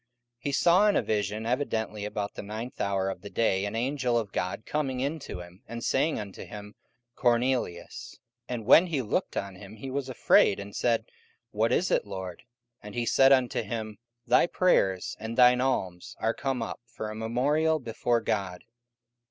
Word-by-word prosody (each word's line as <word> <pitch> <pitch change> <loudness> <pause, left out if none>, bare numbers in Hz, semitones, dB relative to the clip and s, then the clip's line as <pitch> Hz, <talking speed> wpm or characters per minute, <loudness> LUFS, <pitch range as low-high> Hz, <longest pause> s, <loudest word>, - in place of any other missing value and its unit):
44:010:003 - - -56
He 140 - -3
saw 180 +8 +5
in 205 - +3
a - - +3
vision 105 +1 -1
evidently 110 -4 -1
about 105 -1 -3
the - - -6
ninth 110 +4 -6
hour 95 -1 0
of 95 - -4
the 100 - -8
day 100 -4 +1
an 100 +2 -4
angel 125 0 0
of 110 -4 -2
God 100 +4 -3
coming 135 -4 -2
in 145 +5 -1
to 90 - -7
him, 90 +3 -13
and 115 +1 -6
saying 150 +4 +1
unto 100 -2 -7
him, 105 0 -9 0.4
Cornelius. 120 -7 -1 0.3
44:010:004 125 - -1
And 115 -3 -6
when 165 - +7
he 155 -6 -1
looked 105 - -2
on 100 -1 -3
him, 100 +3 -11
he 130 +5 -7
was 135 0 -3
afraid, 115 -5 +4
and 100 0 -8
said, 115 -2 +1 0.5
What 110 +2 +1
is 180 +8 +1
it, - - +1
Lord? 95 -2 -6 0.4
And 105 +2 -10
he 120 -1 -1
said 135 +3 +5
unto 130 -2 +3
him, 110 -1 -5 0.3
Thy - - +4
prayers 95 - +2
and 110 +2 -5
thine 125 0 +6
alms 95 -9 -2
are 115 +1 +1
come 135 -4 -2
up - - -6
for 110 -2 -6
a - - -7
memorial 140 +8 +1
before 120 -2 -1
God. 95 -5 -2
115 Hz, 190 wpm, -28 LUFS, 100-130 Hz, 0.5 s, when